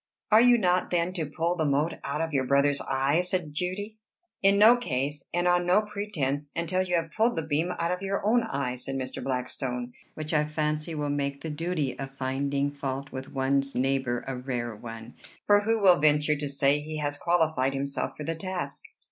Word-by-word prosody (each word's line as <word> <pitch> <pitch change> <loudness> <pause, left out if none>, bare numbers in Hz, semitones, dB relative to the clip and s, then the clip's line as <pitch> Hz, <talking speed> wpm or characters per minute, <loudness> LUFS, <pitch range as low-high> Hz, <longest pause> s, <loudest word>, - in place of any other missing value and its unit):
"Are 215 +1 +8
you 245 0 +6
not, 180 -4 +1
then, 175 +1 0
to 165 -5 -3
pull 165 +4 -1
the 160 - 0
mote 145 +3 +1
out 145 +3 -2
of 165 -1 -2
your 135 -2 +1
brother's 140 +2 +3
eye?" 135 +5 +2
said 180 -4 -2
Judy. 200 +7 -3 0.4
"In 195 0 +5
no 220 +4 +8
case 145 - -3
and 175 +1 +1
on 175 0 +3
no 195 +4 +4
pretence, 170 -10 -3
until 180 +3 0
you 180 -1 0
have 165 -1 -1
pulled 225 +7 +2
the 160 - -1
beam 160 +3 0
out 170 +1 0
of 180 +1 -2
your 195 0 -2
own 235 +3 +4
eye," 140 - -2
said 135 +2 -5
Mr. 130 -1 -4
Blackstone; 125 -1 -3 0.2
"which 155 +1 -4
I 150 -1 +3
fancy 155 +1 -2
will 145 -1 -1
make 140 -1 -2
the 160 - -4
duty 155 -3 -2
of 135 0 -7
finding 140 +2 -1
fault 140 -1 -4
with 130 0 -7
one's 135 0 0
neighbor 130 -2 0
a 135 - -3
rare 125 -3 -3
one; 115 +1 -9 0.3
for 205 0 +6
who 225 +2 +1
will 180 -4 +7
venture 150 0 +4
to 145 0 -3
say 140 +1 +2
he 155 +1 -6
has 145 -1 -2
qualified 155 -5 +1
himself 140 0 -3
for 150 - -5
the 165 - -2
task?" 175 -4 -4
150 Hz, 205 wpm, -27 LUFS, 135-180 Hz, 0.4 s, Are